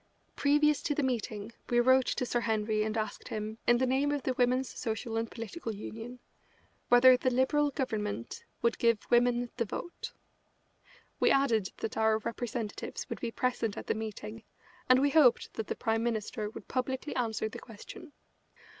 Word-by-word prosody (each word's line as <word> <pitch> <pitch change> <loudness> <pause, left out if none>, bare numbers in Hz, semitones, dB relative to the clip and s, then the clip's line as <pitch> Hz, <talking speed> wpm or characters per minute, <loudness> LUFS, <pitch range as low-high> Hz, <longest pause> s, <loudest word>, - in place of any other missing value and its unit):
Previous 295 +1 +3
to 290 - -1
the 295 - 0
meeting 220 -4 -2 0.2
we 240 - +3
wrote 260 +1 +5
to 250 - 0
Sir 240 - 0
Henry 220 -2 0
and 215 +1 -1
asked 215 - -4
him, 215 +1 -5
in 240 - +6
the 260 - +2
name 270 +3 +1
of 290 -2 -2
the 260 - 0
Women's 250 +1 +1
Social 225 0 -3
and 225 0 -1
Political 230 0 -6
Union, 225 +4 -7 0.7
whether 250 +1 +8
the 255 - +1
Liberal 260 +4 +2
Government 210 - -3 0.2
would 235 - +2
give 230 -1 +4
women 240 0 +3
the 235 - +1
vote. 345 - -6 1.1
We - - +4
added 235 -8 +3
that 220 - -4
our 220 0 +3
representatives 230 -1 -4
would - - -4
be 235 - -2
present 230 -3 -1
at - - -6
the - - 0
meeting, 220 0 -6 0.5
and 255 - +8
we 285 +1 +3
hoped 275 -7 +4
that 220 - -4
the - - -2
Prime 225 0 0
Minister 220 -2 -2
would - - -10
publicly 260 +2 -2
answer 225 -3 -1
the 220 - -8
question. 295 - -11
240 Hz, 170 wpm, -31 LUFS, 220-260 Hz, 1.1 s, whether